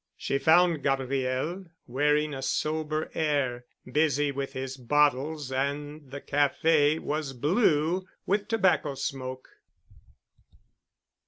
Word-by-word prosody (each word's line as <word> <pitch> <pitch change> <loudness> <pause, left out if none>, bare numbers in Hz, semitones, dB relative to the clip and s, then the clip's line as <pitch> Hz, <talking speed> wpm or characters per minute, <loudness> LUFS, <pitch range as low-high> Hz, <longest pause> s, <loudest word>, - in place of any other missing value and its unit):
She 140 - -1
found 165 0 +4
Gabriel, 135 +6 -1 0.2
wearing 150 +4 +1
a 135 - -5
sober 155 +3 -2
air, 140 -6 -1 0.2
busy 145 +1 +1
with 140 0 -4
his 130 0 -4
bottles 145 +2 +1
and 145 +2 -3
the 140 - -6
café 145 +2 +2
was 150 -3 -3
blue 165 - +1 0.2
with 205 +1 0
tobacco 190 -10 +2
smoke. 130 -1 -5
145 Hz, 100 wpm, -28 LUFS, 135-155 Hz, 0.2 s, found